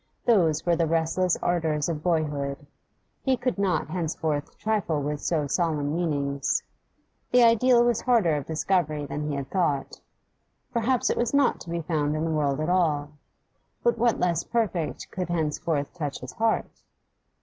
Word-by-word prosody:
Those 170 -10 +3
were 175 -1 +3
the 165 0 +1
restless 165 +2 +1
ardours 160 -4 0
of 160 -3 -3
boyhood: 150 -4 -1 0.6
he 265 -2 +1
could 245 -3 -2
not 180 -7 0
henceforth 160 -4 -2
trifle 210 -8 0 0.2
so 160 +2 -1
with 145 - -5
solemn 155 -4 0
meanings. 140 -5 0 0.7
The 245 0 +5
ideal 235 +1 +5
was 240 -2 +1
harder 225 - +3
of 145 -2 -4
discovery 155 -2 0
than 150 +2 -4
he 145 - -2
had 140 -1 -5
thought; 150 -8 -1 0.7
perhaps 240 +1 +1
it - - -2
was 240 +3 0
not 280 -2 +3
to - - -10
be 170 0 -2
found 150 -2 -1
in 155 +1 -1
the 165 - -1
world 145 -2 0
at 155 - -1
all. 155 -5 +1 0.7
But 235 -1 +2
what 235 0 +2
less 170 -2 +1
perfect 190 -10 -2
could 180 -2 -4
henceforth 155 -3 -1
touch 150 -5 -4
his - - -7
heart? 225 -1 -1
165 Hz, 160 wpm, -26 LUFS, 150-195 Hz, 0.7 s, The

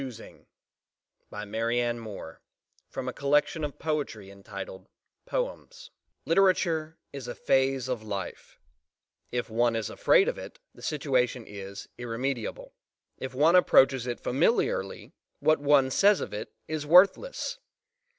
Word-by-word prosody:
POEMS 125 -4 -7 1.1
BY 105 0 -6
MARIANNE 120 +3 -1
MOORE 100 -7 -9 0.5
PICKING 130 - -5 0.5
AND 135 -10 -4
CHOOSING - - -7 0.4
Literature 165 -3 +2 0.2
is 135 -3 -7
a 120 - -5
phase 135 -1 +1
of 125 -3 -2
life: 100 -4 -6 0.7
if 120 -2 -3
one 120 +1 +2
is 115 -2 -2
afraid - - +4
of - - -2
it, - - -9 0.2
the - - -16
situation 130 -5 0
is 100 -1 -8
irremediable; 120 0 -4 0.5
if 130 0 -6
one 155 +6 +5
approaches 135 -8 +5
it 120 - -3
familiarly, 245 - 0 0.3
what 155 -1 +3
one 140 -2 +4
says 200 +7 +5
of - - -5
it 105 - -5 0.2
is 155 -2 -3
worthless. 200 - +4
130 Hz, 115 wpm, -28 LUFS, 115-155 Hz, 1.1 s, one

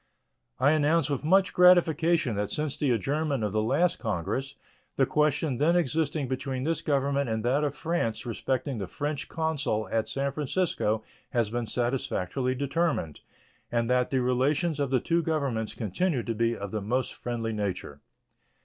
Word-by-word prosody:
I 140 - +5
announce 155 0 +2
with 140 - -2
much 190 +5 +3
gratification 170 - +4
that 105 0 -1
since 150 -2 -2
the 145 - 0
adjournment 140 +3 0
of 105 - 0
the 110 +1 +1
last 170 +11 +1
Congress 135 +11 -2 0.4
the 135 - +3
question 150 -2 +1
then 165 +4 +3
existing 155 -3 0
between 130 0 -3
this 160 +1 -1
Government 140 -3 0
and 110 0 -2
that 135 +5 +2
of 145 -1 -1
France 155 -10 -2
respecting 130 +2 -2
the 95 - -4
French 145 +6 -4
consul 145 -10 -1
at 115 -1 0
San 140 0 -1
Francisco 140 - -1 0.3
has 115 -4 +1
been 120 -1 -2
satisfactorily 125 0 -1
determined, 140 - -1 0.5
and 120 0 0
that 125 0 +2
the 130 -2 +1
relations 140 +6 +1
of 140 -2 0
the 130 -1 +2
two 170 +7 +1
Governments 140 -9 -1
continue 125 - -1
to 115 - -2
be 115 +1 0
of 100 -1 -6
the 110 - -2
most 125 +6 -1
friendly 115 -2 -3
nature. 95 -8 -4
135 Hz, 165 wpm, -28 LUFS, 115-155 Hz, 0.5 s, I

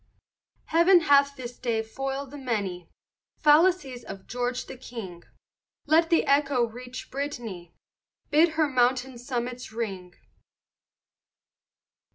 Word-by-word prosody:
Heaven 345 +2 +6
hath 280 -2 +4
this 245 -2 -8
day 225 -2 -1
foil'd 270 +4 -5
the 290 - -8
many 200 -9 -3 0.5
Fallacies 300 -5 +3
of 190 - -9
George 245 +1 -3
the - - -9
King; 225 -9 -8 0.6
Let 325 +2 +4
the 335 - +3
echo 280 -3 +3
reach 250 +2 -9
Britan'y, 240 - -5 0.6
Bid 315 +2 +4
her 315 -1 +2
mountain 255 -1 +1
summits 245 -1 -4
ring. 195 -6 -5
255 Hz, 110 wpm, -26 LUFS, 235-285 Hz, 0.6 s, Heaven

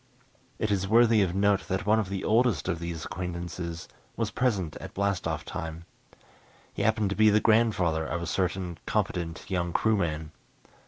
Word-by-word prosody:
It 110 - -1
is 95 -1 0
worthy 115 0 +5
of 90 -2 0
note 100 0 +2
that 95 +3 -2
one 110 +2 +4
of 105 -4 -2
the 95 -1 -3
oldest 110 - +2
of 85 - -1
these 85 -1 -5
acquaintances 85 -1 -5 0.3
was 115 -2 -1
present 100 -11 0
at - - -10
blast 100 -3 0
off 80 -1 -3
time. 85 -2 -6 0.9
He - - -4
happened 110 -3 +2
to - - -1
be 110 0 +5
the 105 +1 +4
grandfather 105 -8 +2
of 85 - -2
a 85 - -4
certain 90 0 -2
competent 85 -2 -2
young 85 -3 -1
crewman. 85 -8 0
95 Hz, 170 wpm, -28 LUFS, 85-105 Hz, 0.9 s, worthy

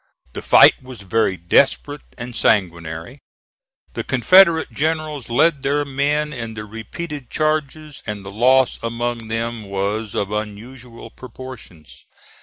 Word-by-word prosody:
The - - -6
fight - - +6
was 130 -4 -11
very 100 0 0
desperate 140 - +1 0.2
and 120 0 -7
sanguinary. 85 - -1 0.7
The - - -4
Confederate 165 +6 +4
generals 155 -3 -2
led 150 +4 +2
their 145 +2 0
men 145 +2 -1
in 115 -4 -6
the 105 0 -6
repeated 125 +6 -7
charges, 155 -1 -2
and 105 -2 -5
the 95 - -7
loss 130 +4 +3
among 115 0 -3
them 115 0 -3
was 100 +2 -3
of 100 0 -2
unusual 115 +3 -7
proportions. 125 - -12
120 Hz, 125 wpm, -20 LUFS, 105-145 Hz, 0.7 s, fight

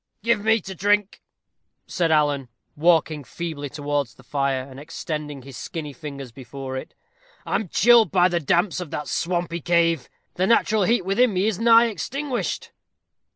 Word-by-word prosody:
"Give 230 -2 +2
me 220 +1 +4
to 190 - -7
drink," 205 +2 +1 0.6
said 170 -2 0
Alan, 145 -4 +2 0.3
walking 160 -2 +2
feebly 145 0 -5
towards 145 -3 -2
the 135 - -18
fire, 135 -1 -1
and 135 0 -11
extending 150 -2 -6
his 135 -1 -11
skinny 150 -3 -6
fingers 140 -4 -8
before 130 +2 -7
it. 130 - -7 0.5
"I - - -4
am 210 - 0
chilled 235 +4 +5
by 180 -1 +4
the 175 -1 0
damps 175 +5 +1
of 180 -4 -6
that 150 -1 -5
swampy 170 -1 -2
cave 165 -5 +2 0.2
the 185 +1 0
natural 220 -2 +3
heat 225 -2 +2
within 205 +3 +2
me 185 +2 +2
is 215 -3 0
nigh 230 0 +6
extinguished." 250 - -3
170 Hz, 160 wpm, -23 LUFS, 145-205 Hz, 0.6 s, nigh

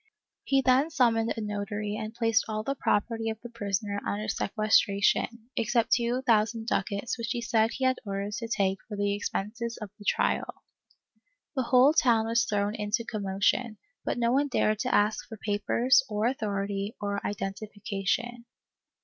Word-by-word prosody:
He 270 -1 +2
then 260 +4 +4
summoned 235 -6 +2
a - - -2
notary 205 0 -3
and 215 0 -4
placed 225 -2 +2
all 215 -1 -3
the 275 - -1
property 225 -3 0
of 220 - -3
the 240 - -8
prisoner 205 -2 -2
under 210 +1 -3
sequestration, 215 +2 +1
except 230 0 +1
two 240 +2 +2
thousand 225 -1 +2
ducats 200 +3 -2
which 230 - -3
he 240 - -1
said 225 -1 +2
he 265 - -4
had 260 0 +2
orders 200 0 -3
to 230 - -4
take 195 -4 0
for 210 - -6
the 205 0 +1
expenses 225 +3 -3
of 210 -3 -7
the 205 - -12
trial. - - 0 0.9
The 265 - +1
whole 255 +4 +5
town 230 -7 +3
was 230 0 +2
thrown 205 0 0
into 215 +2 -2
commotion, 210 +3 0 0.3
but - - -2
no 235 -1 +2
one 280 +3 +2
dared 215 -5 +1
to - - -1
ask 210 +1 +2
for 220 - -9
papers, 220 +6 +2
or 210 0 -1
authority, 200 -4 -2
or 200 0 -3
identification. 210 +4 -3
220 Hz, 165 wpm, -28 LUFS, 205-235 Hz, 0.9 s, whole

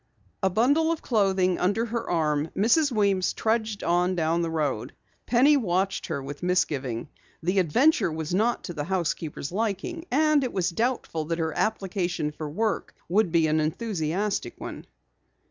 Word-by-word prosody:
A 190 - +3
bundle 285 - +3
of 330 - -3
clothing 190 -5 +2
under 205 +6 +1
her 235 0 -4
arm, 155 -2 +1
Mrs. 260 +9 +3
Weems 200 -5 +2
trudged 220 -2 -1
on 180 +2 +2
down 165 0 +1
the 165 - -1
road. 140 -7 -2 0.3
Penny 260 +5 +5
watched 190 -4 0
her 140 -5 -3
with 145 +1 -7
misgiving. 145 -10 0 0.4
The 180 +4 +2
adventure 210 - +3
was 160 +1 -4
not 225 +6 +1
to 175 - -6
the 145 -3 -4
housekeeper's 165 -4 -2
liking, 225 - -2
and 305 +1 +3
it 255 - -3
was 185 -1 0
doubtful 220 -7 -1
that 165 +1 -2
her 160 -2 -2
application 185 -7 -1
for 150 0 -6
work 215 +8 -2
would 190 -1 +2
be 165 -1 +3
an 155 0 +2
enthusiastic 175 - -2
one. - - -7
185 Hz, 160 wpm, -26 LUFS, 160-225 Hz, 0.4 s, Penny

